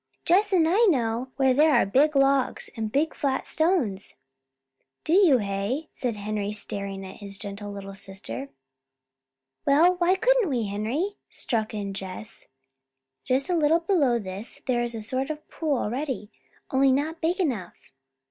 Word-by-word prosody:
"Jess 395 +5 +4
and 340 -4 +4
I 390 +8 +4
know 245 - +1
where 265 -1 +3
there 300 +2 +4
are 240 - +4
big 280 +9 +3
logs, 275 -1 +2
and 220 -2 -3
big 305 +5 +1
flat 270 -2 -1
stones." 315 - 0 0.9
"You 370 +4 +6
do, - - +6
hey?" 205 +8 -2
said 245 -4 -2
Henry 205 0 -3
staring 200 -2 -5
at 190 - -10
his 200 -2 -8
gentle 205 0 -7
little 195 -1 -7
sister. 165 - -7 1.1
"Well, 335 +6 +4
why 355 +1 +3
couldn't 475 -1 +3
we, 240 -5 0
Henry?" 235 - -2
struck 220 -3 -3
in 200 -2 -4
Jess. 195 +3 -6 0.8
"Just 260 +4 +2
a 360 - +1
little 320 +1 +3
below 315 -9 +2
this 200 +1 -5
there 245 -2 +1
is 240 -1 -3
a 225 - -5
sort 260 +5 -1
of 305 0 -6
pool 305 -4 -1
already, 245 -1 -3 0.4
only 270 0 +4
not 310 +5 -1
big 345 +4 0
enough." 245 - -2
255 Hz, 155 wpm, -26 LUFS, 205-315 Hz, 1.1 s, You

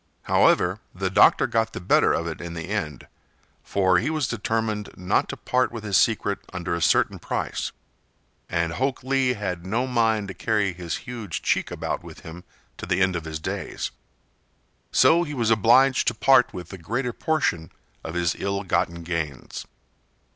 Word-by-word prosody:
However, - - +3 0.2
the - - -2
doctor - - +5
got 110 0 0
the - - -5
better 90 - +3
of 85 - 0
it 80 -1 -5
in 85 0 -6
the 85 +2 -6
end, 80 - -3 0.6
for 95 -2 +2
he - - -1
was 155 -5 0
determined 110 -2 -2
not 90 0 +1
to - - -5
part 125 0 0
with 115 -2 -7
his 100 -2 -1
secret 100 -2 +2
under 90 -1 -3
a 85 - -2
certain - - +2
price, - - -3 0.8
and 85 -1 0
Hok 130 +5 -1
Lee 130 -1 +2
had 95 -6 -4
no 115 +7 -1
mind 110 -4 +1
to - - -5
carry 105 -4 0
his 85 -2 -4
huge 115 -8 -5
cheek - - +1
about - - -4
with - - -11
him 85 +2 -10 0.3
to - - -7
the 90 - +1
end 95 -1 +2
of 85 -2 -4
his 80 -1 -4
days. - - -4 1.0
So 170 +1 +5
he 150 -4 -4
was 115 -3 +1
obliged 125 +5 +4
to 120 - +2
part 125 0 +5
with 90 -2 -8
the 95 - -9
greater 120 +8 -2
portion 130 - -1 0.3
of 80 - -6
his 85 -1 +1
ill 100 0 -2
gotten 85 -2 -1
gains. 80 -5 -4
100 Hz, 175 wpm, -24 LUFS, 85-120 Hz, 1.0 s, doctor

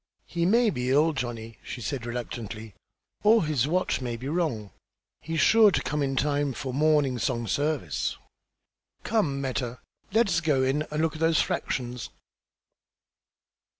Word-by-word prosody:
"He 170 0 -1
may 230 +2 +4
be 125 -1 -2
ill, 150 +4 +4
Johnny," 115 -4 -5
she - - -7
said, 120 +2 -4
reluctantly, 115 -3 -6 0.5
"or 215 -3 +5
his 145 -4 +1
watch 180 -3 0
may 120 -2 -3
be 125 +3 -6
wrong. 145 - -1 0.5
He's 165 +1 -3
sure 220 +4 +7
to - - 0
come 150 0 -1
in 135 -1 0
time 145 0 +1
for 130 -1 -5
morning 145 -3 +2
song 120 -1 -1
service. 140 - -1 0.9
Come, 170 -12 0
Meta, 125 -2 -3 0.3
let 225 +2 +3
us 170 - +1
go 145 -5 +2
in 145 +4 0
and 150 +1 -1
look 160 - +1
at 155 - -8
those 165 -1 +3
fractions." 125 -2 -2
140 Hz, 150 wpm, -27 LUFS, 125-160 Hz, 0.9 s, sure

